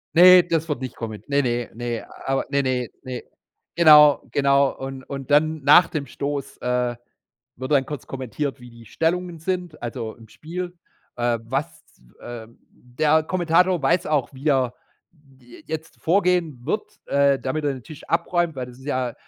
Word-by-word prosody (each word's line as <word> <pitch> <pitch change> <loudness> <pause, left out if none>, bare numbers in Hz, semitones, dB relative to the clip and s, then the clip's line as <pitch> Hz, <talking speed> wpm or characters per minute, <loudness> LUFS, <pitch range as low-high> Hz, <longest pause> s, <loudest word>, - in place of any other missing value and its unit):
Ne, 180 +1 +9
das 165 -2 -1
wird 145 -4 -3
nicht 130 -2 -5
komment 110 +3 -7
ne, 140 0 +2
ne, 120 -1 -1
ne, 120 -1 -4 0.2
aber 135 0 0
ne, 140 -1 +1
ne, 125 -2 -1
ne. 130 -1 -6 0.5
Genau, 150 -3 +7
genau, 140 -1 +3
und 135 0 -7
und 140 +1 -7
dann 155 +1 +3
nach 165 +5 +7
dem 145 -3 -4
Stoß, 140 -1 -4
äh, 125 -1 -1 0.6
wird 130 +2 -6
dann 135 -2 +3
kurz 145 -2 -7
kommentiert, 135 +2 -4
wie 125 -1 -13
die 115 -1 -15
Stellungen 170 +4 -1
sind 180 -1 -4
also, 115 -2 -5
im 115 -2 -16
Spiel, 175 +5 -7 0.4
äh, 120 -1 0
was, 135 +6 -4 0.2
w - - -25
ähm, 115 -1 -9
der 150 +6 +1
Kommentator 175 +1 +2
weiß 170 +6 +2
auch, 150 -3 0
wie 135 +3 -4
er 130 -3 +2 0.6
j 120 -2 -16
jetzt 160 +1 -6
vorgehen 175 -7 +1
wird, - - -3
äh, 140 -1 +3
damit 150 +4 -3
er 140 -2 0
den 130 - -10
Tisch 155 +1 -12
abräumt, 170 -2 0
weil 125 -1 -4
das 125 0 -13
ist 130 - -14
ja 130 -4 -1
140 Hz, 175 wpm, -23 LUFS, 125-160 Hz, 0.6 s, Ne